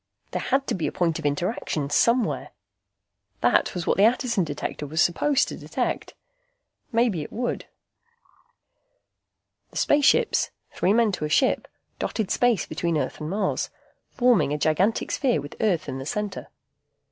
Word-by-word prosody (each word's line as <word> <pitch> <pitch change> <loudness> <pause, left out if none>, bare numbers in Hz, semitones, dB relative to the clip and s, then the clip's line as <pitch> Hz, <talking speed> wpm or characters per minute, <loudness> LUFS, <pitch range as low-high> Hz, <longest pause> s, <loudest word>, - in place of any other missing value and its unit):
There - - -2
had 270 +1 +1
to - - -1
be 175 - -1
a - - -2
point 165 -2 0
of 155 - 0
interaction, 145 -2 -2
somewhere. 235 +8 +2 0.9
That 120 +8 +3
was 175 -2 -3
what - - +1
the 195 - +5
Attison 235 -3 +2
Detector 145 -1 -4
was 160 +3 -3
supposed 275 +12 +3
to - - -5
detect. - - -3 0.8
Maybe 230 -8 +2
it 150 - -7
would. 245 +2 -3 2.0
The - - -9
spaceships, 295 - +3 0.2
three 185 - +1
men 230 -1 +3
to 180 -5 -3
a - - -3
ship, 260 - +2 0.3
dotted 220 -4 -2
space 240 -7 +2
between 170 -2 -1
Earth 150 - -3
and 155 - -4
Mars, 195 +1 -1 0.4
forming 235 - +3
a 150 - 0
gigantic 165 +9 +1
sphere 260 - +1
with 145 +1 -8
Earth 195 -7 +1
in 135 -1 -4
the 135 - -6
center. 210 +3 -3
190 Hz, 155 wpm, -25 LUFS, 155-235 Hz, 2.0 s, the